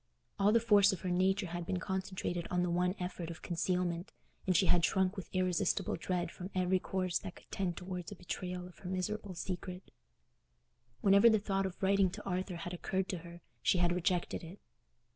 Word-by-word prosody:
All 200 +1 +5
the 230 - +5
force 205 -3 +6
of 190 - -4
her 185 - -2
nature 190 +3 +2
had 175 0 -4
been 185 +2 -1
concentrated 185 -2 -3
on 180 0 +1
the 180 - 0
one 180 +2 +1
effort 180 -2 -4
of 170 - -8
concealment, 175 0 -1 0.4
and 185 -3 +4
she 190 - +4
had 175 -1 +4
shrunk 190 +2 +2
with 190 - -7
irresistible 185 -2 +1
dread 175 +1 -2
from 180 +1 -7
every 185 0 +2
course 185 -1 -1
that 190 -3 -8
could - - -18
tend 180 -3 -1
towards 180 -1 -5
a - - -6
betrayal 180 0 -4
of 180 - -16
her 180 - -7
miserable 190 +1 -2
secret. 180 +1 -5 1.1
Whenever 200 +3 +7
the 220 - +5
thought 195 -2 0
of 190 +1 -9
writing 195 0 +4
to 210 +4 -8
Arthur 185 -1 -2
had 175 +1 -5
occurred 190 +2 -1
to 180 - -2
her, 170 +1 -11 0.2
she - - +3
had 175 -1 +3
rejected 180 0 0
it. 170 +5 -9
185 Hz, 200 wpm, -34 LUFS, 175-190 Hz, 1.1 s, Whenever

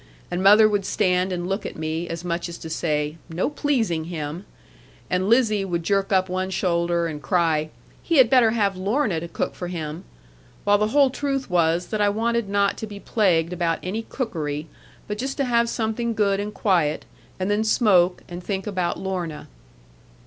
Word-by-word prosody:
And 175 - -1
mother 210 +3 +7
would 205 -2 0
stand 185 -1 +1
and 175 -1 -3
look 195 +2 -2
at - - -6
me, 160 +2 -3
as 165 +1 -5
much 170 0 -2
as 170 - -7
to 160 - -8
say, 150 -1 -1
'No 175 - -1
pleasing 225 - 0
him'; 165 +2 -5 0.7
and 185 +2 +1
Lizzie 225 -4 +3
would 175 -3 -2
jerk 195 +3 0
up 185 -1 +3
one 185 +1 -2
shoulder, 170 -2 0
and 155 -3 -5
cry, 155 0 +1 0.3
'He 335 - +1
had 260 -3 +7
better 245 -2 +5
have 205 -4 +1
Lorna 200 - 0
to 170 - -6
cook 170 - -3
for 180 - -6
him'; 160 -1 -5 0.6
while 205 0 +4
the 210 - +2
whole 275 +3 +4
truth 275 -4 -2
was 170 0 +2
that 215 -1 -1
I 205 - +4
wanted 230 +1 0
not 200 0 +1
to 220 - -5
be 205 -1 -9
plagued 180 -6 +1
about 170 -2 0
any 200 +5 -2
cookery; 155 - -4 0.4
but 210 0 -4
just 265 +2 -3
to 280 - +1
have 235 -1 +2
something 230 0 -2
good 200 -2 +2
and 205 +1 -3
quiet, 180 -7 +1 0.3
and 185 +2 0
then 210 +1 +2
smoke 190 -5 +3
and 175 +1 -8
think 195 0 -3
about 185 -4 -1
Lorna. 180 -5 -4
190 Hz, 190 wpm, -23 LUFS, 170-215 Hz, 0.7 s, mother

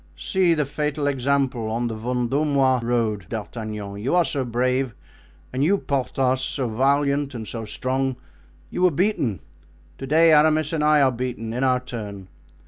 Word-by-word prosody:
See 185 -3 +2
the 150 -2 0
fatal 150 +1 -2
example: 135 -4 0
on 120 +2 -1
the 115 - -3
Vendomois 130 +3 +1
road, 115 -3 -1
D'Artagnan, 105 -2 -5
you 140 +12 +2
so 140 -4 -1
brave, 125 +1 0 0.6
and 130 - 0
you, 195 +7 +3
Porthos, 130 -3 0
so 130 -1 -1
valiant 140 +3 +1
and 110 -2 -6
so 115 -2 -5
strong—you 130 - -4
were 180 - +6
beaten; 160 - 0 0.6
to 135 - -6
day 160 +3 +5
Aramis 155 +1 +3
and 155 -2 0
I 150 -1 +5
are 130 - +4
beaten 120 -2 -4
in 125 +3 -1
our 130 -1 +3
turn. 105 -6 -7
130 Hz, 150 wpm, -23 LUFS, 115-145 Hz, 0.6 s, were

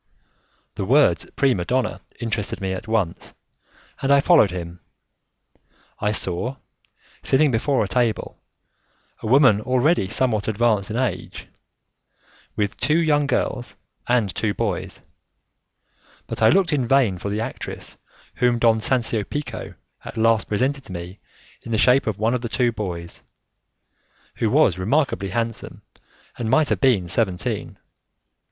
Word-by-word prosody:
The - - -4
words 140 +8 +3
prima 130 -10 +2
donna 125 +6 -1 0.2
interested 115 -3 -3
me 95 -1 -3
at 95 - -7
once, 110 -7 -2 0.7
and 135 - +1
I 140 - +6
followed 150 - +5
him. 90 -1 -7 1.2
I 105 - 0
saw, 105 +5 -1 0.7
sitting 145 +1 +3
before 125 +3 +1
a - - -3
table, 120 0 -1 0.8
a - - -5
woman 130 -4 +5
already 130 - +2
somewhat 110 -5 +1
advanced 110 -2 +1
in 110 - -3
age, 130 0 -3 1.1
with 105 0 -2
two 155 +2 +2
young 150 -3 +2
girls 125 -2 -2 0.3
and 120 -6 +1
two 105 -2 -1
boys, 105 -7 -3 1.2
but - - -6
I 110 - +6
looked 185 -4 +3
in 140 -3 +1
vain 120 -9 +2
for 100 - -4
the 105 +2 -2
actress, - - -6 0.4
whom 125 -1 +2
Don 115 -1 +3
Sancio 115 -2 0
Pico 145 +8 -6 0.3
at - - -9
last 115 -1 +2
presented 130 +6 0
to - - -11
me 90 +2 -8 0.4
in 115 - -9
the 110 - +1
shape 125 +3 +4
of 110 - -1
one 110 +3 +1
of 125 - -1
the 120 - -4
two 120 0 +1
boys, 85 -6 -6 1.2
who - - +1
was 90 - +3
remarkably 115 -2 0
handsome 115 +2 -4 0.6
and 115 -2 -2
might 150 +4 +3
have - - -1
been 120 -10 +3
seventeen. 95 -1 -2
115 Hz, 140 wpm, -22 LUFS, 100-130 Hz, 1.2 s, I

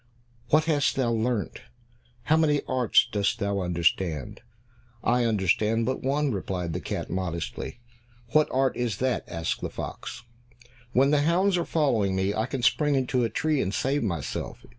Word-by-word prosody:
What 155 +1 +5
hast 150 -4 +1
thou 125 -3 +1
learnt? 115 -1 -1 0.6
How 150 +6 +3
many 150 -3 +2
arts 125 -4 +3
dost 100 +1 0
thou 100 -3 -1
understand?" 85 -4 -1 0.6
"I 120 0 +2
understand 110 +2 +1
but 130 +2 -2
one," 140 +1 0
replied 90 -4 -3
the 90 - -2
cat, - - -4
modestly. 90 +5 -4 0.5
"What 155 +5 +4
art 135 0 +1
is 120 -5 -2
that?" 130 -1 0
asked 85 -1 -3
the - - -3
fox. - - -7 0.7
"When 135 +3 +4
the 150 -1 +4
hounds 180 +5 +2
are 170 -2 0
following 115 - +1
me, 95 +1 0
I 110 +3 -1
can 130 -1 -4
spring 150 +3 +3
into 130 -1 +1
a 115 - +1
tree 150 +5 0
and 95 - -1
save 135 +7 0
myself." 85 -10 -4
120 Hz, 160 wpm, -26 LUFS, 95-140 Hz, 0.7 s, What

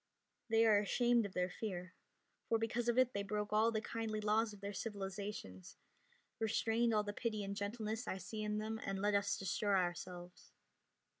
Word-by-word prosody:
They 225 0 +5
are 215 -2 +6
ashamed 235 +2 +3
of 190 - -14
their 180 0 +1
fear, 185 -3 -4 0.6
for 230 - +4
because 235 +2 0
of 240 - +2
it 255 -1 +4
they 200 - -1
broke 210 +1 -2
all 220 +2 +4
the 220 -1 0
kindly 220 -1 -2
laws 215 +1 +2
of 205 - -11
their 200 +1 -5
civilizations, 195 - -5 0.6
restrained 225 +1 +2
all 210 -1 +3
the 205 0 -4
pity 215 -2 -2
and 200 0 -3
gentleness 215 +2 -3
I 190 - -1
see 215 +4 -5
in 210 0 -1
them, 220 +1 -2
and 195 0 -2
let 205 +1 +2
us 200 0 +2
destroy 200 +2 0
ourselves. 175 0 -4
210 Hz, 180 wpm, -37 LUFS, 200-225 Hz, 0.6 s, are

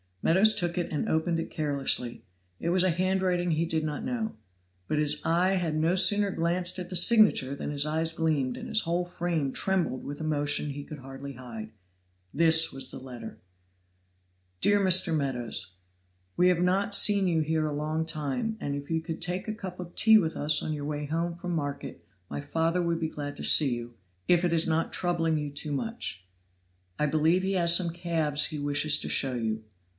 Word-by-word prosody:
Meadows 195 +6 +5
took 175 -1 -1
it 175 - -3
and 150 - -2
opened 165 +1 0
it 165 - -5
carelessly; 140 -6 -1 0.4
it 170 - -2
was 180 +1 +3
a 185 - +3
handwriting 180 0 0
he 160 +1 0
did 160 -1 -1
not 150 -1 -4
know. 235 -4 -3 0.5
But 150 - -1
his 150 0 +1
eye 175 +3 +2
had 170 -4 -1
no 160 +3 +1
sooner 205 +2 +5
glanced 175 +2 -1
at 180 -1 -6
the 185 - -6
signature 180 - +5
than - - -5
his 145 0 +1
eyes 160 +1 +1
gleamed 150 -6 -1
and - - -7
his 220 - +1
whole 175 +1 -1
frame 170 -5 -2
trembled 180 -9 -1
with 145 +2 -7
emotion 145 -1 0
he 145 +1 -7
could 150 0 -10
hardly 135 +1 -9
hide. 115 -4 -9 0.6
This 160 +1 +4
was 135 - -7
the - - -9
letter: 125 -4 -10 1.2
"DEAR 205 - +3
MR. 185 -3 +4
MEADOWS 125 -9 -2 0.6
We 180 - +4
have 175 -1 +1
not 195 +3 +1
seen 200 -1 +3
you 165 -2 +1
here 155 0 0
a 150 - -3
long 155 +2 -2
time, 155 - -3
and 140 - -3
if 140 0 -7
you 160 0 0
could 160 0 -6
take 180 +3 -3
a 215 - -2
cup 185 -4 -8
of 175 -1 -9
tea 220 -1 +6
with 165 -4 -2
us 150 0 +2
on 155 - -3
your 145 -1 -5
way 150 0 -4
home 165 +3 -2
from 175 +1 -6
market, 145 -3 -5 0.3
my - - -5
father 165 +4 -1
would 170 -1 -1
be 160 -1 -2
glad 145 -1 -6
to - - -7
see 135 -6 +5
you, 120 0 -8 0.3
if 175 0 +3
it 175 - 0
is 165 +1 +2
not 165 0 -1
troubling 165 -3 0
you 150 -1 -4
too 150 +1 -5
much. 140 - -4 0.7
"I 150 - +1
believe 160 +4 +2
he 190 +1 -1
has 170 -2 +3
some 175 -1 +2
calves 160 -4 +2
he 155 - -5
wishes 145 +1 +3
to - - -5
show 135 -2 0
you. 110 -2 -3
160 Hz, 200 wpm, -27 LUFS, 145-175 Hz, 1.2 s, tea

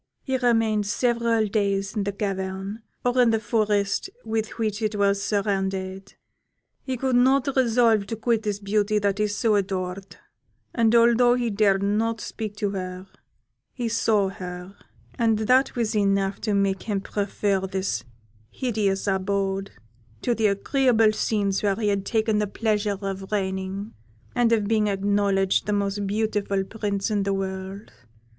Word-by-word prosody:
He 265 - -1
remained 225 -4 +2
several 235 0 +1
days 200 -1 -1
in 205 -2 -1
the 200 - -1
cavern, 195 +1 -4 0.2
or 245 +1 +3
in 240 - +5
the 225 -1 +2
forest 210 -2 0 0.2
with 220 0 -1
which 215 -1 -2
it 215 -1 -1
was 200 -1 +2
surrounded; 195 -2 -2 0.7
he 260 -1 -4
could 260 +1 0
not 260 +2 +4
resolve 230 -5 +3
to 225 - -3
quit 225 0 0
this 210 -2 -2
beauty 205 +1 0
that 200 -1 0
he 210 - +2
so 210 +2 +1
adored, 190 -1 -2 0.6
and 230 -1 +3
although 235 +1 +5
he 240 -2 -1
dared 200 -1 +2
not 220 +3 0
speak 215 -1 -6
to 205 -1 -1
her, 185 -1 -5 0.7
he 245 -2 -3
saw 215 -3 +2
her, 180 0 -8 0.4
and 225 -2 +3
that 255 +5 +2
was 230 -3 -1
enough 195 -1 +1
to 210 -3 0
make 195 -1 +1
him 205 -3 -2
prefer 200 -1 -1
this 190 0 -2 0.5
hideous 210 - -1
abode 195 0 -1 0.5
to 240 - +2
the 225 -2 +2
agreeable 225 +2 +3
scenes 200 -3 0
where 200 -2 +1
he 210 -1 0
had 200 -1 -1
the 215 -2 +1
pleasure 210 -2 0
of 195 -1 -5
reigning, 190 +1 -3 0.4
and 240 -2 +2
of 215 -3 +2
being 215 -1 +2
acknowledged 200 -1 +1
the 210 - +1
most 200 0 -1
beautiful 205 -2 0
Prince 205 0 -3
in 205 -1 +1
the 195 0 0
world. 190 +1 -5
205 Hz, 150 wpm, -24 LUFS, 195-225 Hz, 0.7 s, in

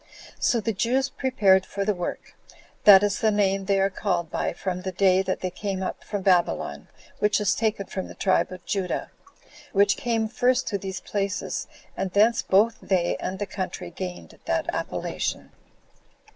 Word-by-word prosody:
So 235 - +2
the 225 +1 -1
Jews 260 +6 0
prepared 215 -9 +3
for 200 +1 -4
the 210 - +2
work: 175 -2 -6 0.5
that 200 -1 +9
is 205 -1 0
the 220 - +3
name 195 -2 +1
they 195 0 +2
are 195 +1 +2
called 175 -5 -2
by - - -1
from 180 +1 -4
the 190 +1 -4
day 185 0 +3
that 190 -1 -2
they 185 - -2
came 190 0 -3
up - - -5
from 205 -2 -4
Babylon, 180 -2 +1 0.3
which 210 0 +2
is 205 -2 +2
taken 215 -3 -1
from 190 0 -5
the - - -11
tribe 190 - +1
of 185 -1 -10
Judah, 190 -3 -2 0.6
which 200 0 +4
came 225 -2 0
first 245 +3 +1
to 200 - -2
these 190 -1 -5
places, 200 0 -3 0.3
and 190 - -2
thence 215 +5 +3
both 215 +4 +3
they 180 -3 +1
and 190 - -4
the 205 - -2
country 185 -2 -5
gained 180 - -7
that - - 0
appellation. - - -3
195 Hz, 175 wpm, -25 LUFS, 185-210 Hz, 0.6 s, that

